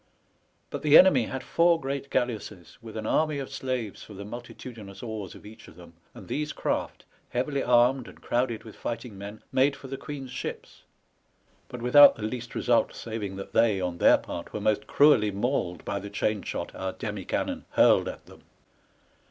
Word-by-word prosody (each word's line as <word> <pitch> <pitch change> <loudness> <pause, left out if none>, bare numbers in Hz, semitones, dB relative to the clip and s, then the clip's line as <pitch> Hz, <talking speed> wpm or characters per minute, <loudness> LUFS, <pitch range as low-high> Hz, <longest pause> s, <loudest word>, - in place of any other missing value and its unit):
But - - -4
the 150 0 +7
enemy 145 -11 +6
had 130 +2 -5
four 170 0 +3
great 140 0 -4
galleasses, 105 -7 -3
with 110 -1 -9
an 110 - -4
army 155 +4 +1
of 135 -1 -5
slaves 125 -6 -3
for 105 - -11
the 100 - -7
multitu 120 +3 -8
dinous 100 -2 -11
oars 110 -5 -6
of - - -14
each 110 +1 -13
of - - -15
them, 85 -1 -14 0.2
and - - -11
these 150 +1 -2
craft, - - -3 0.2
heavily 135 +3 -1
armed, 125 +1 +3
and - - -13
crowded 120 -2 -1
with 110 - -12
fighting 115 -2 -5
men, 100 +2 -9
made 135 +2 +3
for 135 -1 -11
the 135 - -4
Queen's 135 -3 -7
ships, - - -7 0.9
but 125 -1 -8
without 145 +4 +8
the 110 - -8
least 120 +2 -5
result, 120 -1 +2
saving 110 -4 -5
that 95 - -8
they, 115 -4 +3
on 90 -2 -3
their - - +6
part, - - -7
were - - -3
most 110 - 0
cruelly 140 -8 +5
mauled 100 - -2
by 100 0 -2
the 100 +1 -8
chain 105 0 -1
shot - - -5
our 95 0 -4
demi 105 -3 -5
cannon - - -3
hurled - - +5
at - - -7
them. - - -16
115 Hz, 190 wpm, -27 LUFS, 105-130 Hz, 0.9 s, without